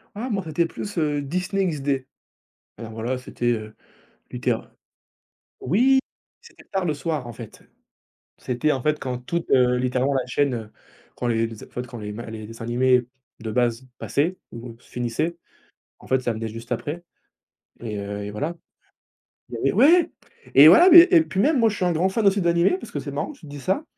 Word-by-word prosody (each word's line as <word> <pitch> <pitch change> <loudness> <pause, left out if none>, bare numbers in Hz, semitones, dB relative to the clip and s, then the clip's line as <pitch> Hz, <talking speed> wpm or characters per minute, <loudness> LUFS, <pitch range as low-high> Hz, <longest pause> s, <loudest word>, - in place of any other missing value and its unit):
Ah, 240 +5 -4
moi, 195 -4 -1
c'était 165 +2 0
plus, 205 +2 -7
heu, 145 -2 0
Disney 185 +6 -1
XD, 140 -5 -1 0.7
alors, 115 -1 -9
voilà, 115 +4 -3
c'était, 120 -1 -2
heu, 110 -1 -5 0.6
Luther - - -1 1.0
oui, 250 - +3 0.4
c'était 465 - -17
tard 190 -2 -2
le 155 - 0
soir, 150 -2 -3
en 120 - -8
fait, 115 -1 -11 0.7
c'était, 130 +5 -1
en 135 - -2
fait, 150 +3 +1
quand 130 -3 -4
toute, 165 +7 -4
heu, 125 -1 +4
littéralement, 125 +2 0
la 130 -2 0
chaîne, 140 +1 0
heu, 110 -3 -6 0.5
quand 125 - -2
les 115 -1 +1
les, 115 -2 -10
en - - -22
fait, 125 - -5
quand 120 -1 -10
les 105 -1 -6
ma 115 +2 -7
les 110 -1 -8
dessins 115 +1 -9
animés 125 +1 +2 0.4
de 110 -1 -4
base 120 +1 0
passaient 165 +6 -1 0.2
ou 115 0 -9
finissaient, 125 +8 -3 0.6
en - - -16
fait, 130 0 +2
ça 120 - 0
venait 115 0 -5
juste 115 +2 -10
après 145 +8 -3 0.8
et 110 -3 -5
heu 100 0 -5
et 105 - -6
voilà. 150 +11 -3 1.0
Il - - -6
avait - - 0
ouais! 335 +4 +5 0.5
Et - - +10
voilà, 355 +2 +8
mais 345 0 +12
et 345 -3 +7
puis 190 -11 -3
même, 295 +2 +3
moi, 225 -1 +4
je 210 - -4
suis 185 - -1
un 180 - +2
grand 175 +3 +1
fan 205 +2 +1
d'animés 175 - +2
parce - - -11
que - - -3
c'est - - -6
marrant - - -3
que - - -19
tu - - -14
te 145 - -11
dise 145 -1 -8
ça, 190 +11 0
130 Hz, 200 wpm, -23 LUFS, 120-175 Hz, 1.0 s, mais